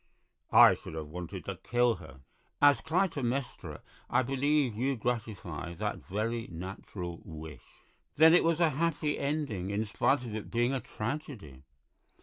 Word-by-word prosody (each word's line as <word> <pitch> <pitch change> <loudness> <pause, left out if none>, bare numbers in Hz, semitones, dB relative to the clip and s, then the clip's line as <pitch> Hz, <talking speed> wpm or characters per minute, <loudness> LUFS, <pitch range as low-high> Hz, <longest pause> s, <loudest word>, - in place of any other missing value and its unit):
'" - - -44
"I - - +7
should - - -8
have 80 -2 -5
wanted 90 +1 -7
to - - -4
kill 120 -2 +1
her." 70 -6 -13 0.4
"As 145 -4 +6
Clytemnestra 145 -7 -1 0.3
I - - +3
believe 135 0 +1
you 130 +5 0
gratify 105 - -4
that - - -2
very 115 +3 -2
natural 90 0 -7
wish." 80 -4 -9 0.5
"Then 160 +2 +7
it 175 - +6
has 165 0 +2
a 165 -3 +4
happy 150 0 0
ending, 140 - -2
in 105 +2 -1
spite 110 +3 +1
of 115 - -6
it 110 -1 -5
being 120 +3 +1
a 135 - 0
tragedy?" 110 - -6
120 Hz, 150 wpm, -30 LUFS, 90-145 Hz, 0.5 s, I